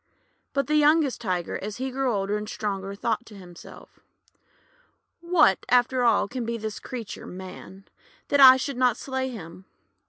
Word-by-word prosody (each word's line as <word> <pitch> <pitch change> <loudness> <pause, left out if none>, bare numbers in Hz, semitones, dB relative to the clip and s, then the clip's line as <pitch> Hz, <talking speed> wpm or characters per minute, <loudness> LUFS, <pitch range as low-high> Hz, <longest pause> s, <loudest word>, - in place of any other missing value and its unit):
But 275 -1 0
the 305 +2 +1
youngest 300 -3 +3
Tiger, 180 -6 -2
as 205 +1 -6
he 260 +1 -4
grew 265 0 -1
older 200 -1 -1
and 210 0 -5
stronger, 195 -2 -4
thought 225 +3 -2
to 215 - -13
himself: 175 -3 -14 0.6
— - - -36 0.4
'What, 340 - +3
after 250 +1 +3
all, 230 -4 +3
can 250 +3 -5
be 230 0 -3
this 220 -1 -6
creature 235 -5 -8
Man, 190 +1 -10 0.4
that 285 - +2
I 260 -1 +10
should 265 0 -4
not 250 -2 +2
slay 265 -1 -3
him? 185 -5 -10
235 Hz, 165 wpm, -25 LUFS, 200-265 Hz, 0.6 s, I